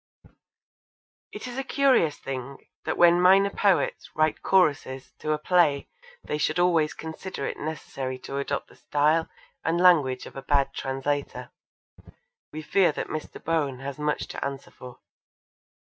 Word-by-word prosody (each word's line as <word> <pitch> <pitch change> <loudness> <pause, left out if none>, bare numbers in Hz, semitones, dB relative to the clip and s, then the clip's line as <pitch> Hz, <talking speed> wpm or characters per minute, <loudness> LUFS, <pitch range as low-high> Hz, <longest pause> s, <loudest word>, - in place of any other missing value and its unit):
It - - -8
is 250 +1 -5
a - - -2
curious 265 - +2
thing 135 0 -6 0.3
that - - -2
when 175 0 +6
minor 195 +2 +5
poets 195 -3 +1
write 155 0 +1
choruses 145 -8 +1
to 155 - -2
a 155 - +2
play 150 -3 +2 0.3
they 150 - -3
should 155 +2 0
always 170 -4 +2
consider 160 -1 -6
it - - -4
necessary 135 -4 -5
to 140 - -4
adopt 140 0 -3
the - - -18
style 155 +3 +1 0.3
and 165 +1 0
language 150 -8 +4
of - - -12
a 135 - -6
bad 140 0 +1
translator. 140 +2 -3 1.0
We 155 +1 -7
fear 185 +2 +3
that - - -4
Mr. 155 - -6
Bohn 150 -5 0
has 140 +1 -6
much 150 0 -1
to - - -5
answer 140 -1 -5
for. 125 -1 -12
150 Hz, 150 wpm, -26 LUFS, 140-175 Hz, 1.0 s, when